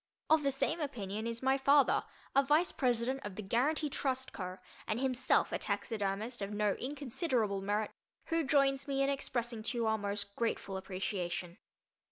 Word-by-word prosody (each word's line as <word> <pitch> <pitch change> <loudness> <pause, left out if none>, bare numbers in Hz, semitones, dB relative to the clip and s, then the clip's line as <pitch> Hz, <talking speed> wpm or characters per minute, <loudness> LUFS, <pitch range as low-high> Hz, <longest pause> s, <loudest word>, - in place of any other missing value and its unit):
Of 315 -1 +6
the 280 - +2
same 275 +5 0
opinion 220 -7 -3
is 230 +1 -3
my 265 +1 +3
father, 280 0 +5 0.3
a 275 - +7
vice 300 +5 +3
president 255 +1 0
of 205 -2 -6
the 215 - -5
Guaranty 275 +10 +1
Trust 260 -2 -2
Co., 185 -1 -5 0.3
and 215 +1 0
himself 255 -1 +2
a - - -1
taxidermist 215 +2 -1
of 200 +1 -3
no 210 -1 +1
inconsiderable 250 - -1
merit, 205 +2 0 0.3
who 330 -1 +1
joins 275 -1 +3
me 275 -1 +1
in 275 - +2
expressing 240 -4 -2
to 235 +3 -1
you 230 - +1
our 220 0 +2
most 200 0 -3
grateful 225 -4 -1
appreciation. 185 -2 -3
235 Hz, 170 wpm, -33 LUFS, 205-275 Hz, 0.3 s, a